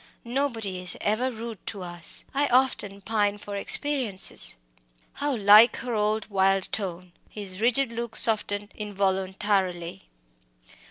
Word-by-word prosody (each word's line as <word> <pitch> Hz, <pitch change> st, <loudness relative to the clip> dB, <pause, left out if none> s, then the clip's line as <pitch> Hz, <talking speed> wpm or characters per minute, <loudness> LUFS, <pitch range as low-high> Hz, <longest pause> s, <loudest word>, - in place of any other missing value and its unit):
"Nobody 235 Hz, -7 st, -3 dB
is 180 Hz, -1 st, +1 dB
ever 220 Hz, +5 st, -1 dB
rude 230 Hz, -4 st, -8 dB
to 200 Hz, -4 st, -6 dB
us 175 Hz, -1 st, -1 dB
I 285 Hz, +1 st, 0 dB
often 240 Hz, -6 st, 0 dB
pine 205 Hz, -1 st, -1 dB
for 205 Hz, 0 st, -8 dB
experiences!" 245 Hz, -1 st, +3 dB, 0.6 s
How 290 Hz, -2 st, -2 dB
like 210 Hz, +2 st, +6 dB
her 245 Hz, 0 st, -5 dB
old, 215 Hz, 0 st, -1 dB
wild 195 Hz, -1 st, +1 dB
tone! 180 Hz, -3 st, -5 dB, 0.2 s
His 200 Hz, -2 st, -9 dB
rigid 245 Hz, +2 st, +2 dB
look 235 Hz, -1 st, -6 dB
softened 205 Hz, -2 st, +1 dB
involuntarily. 190 Hz, -, -2 dB
205 Hz, 120 wpm, -25 LUFS, 190-235 Hz, 0.6 s, like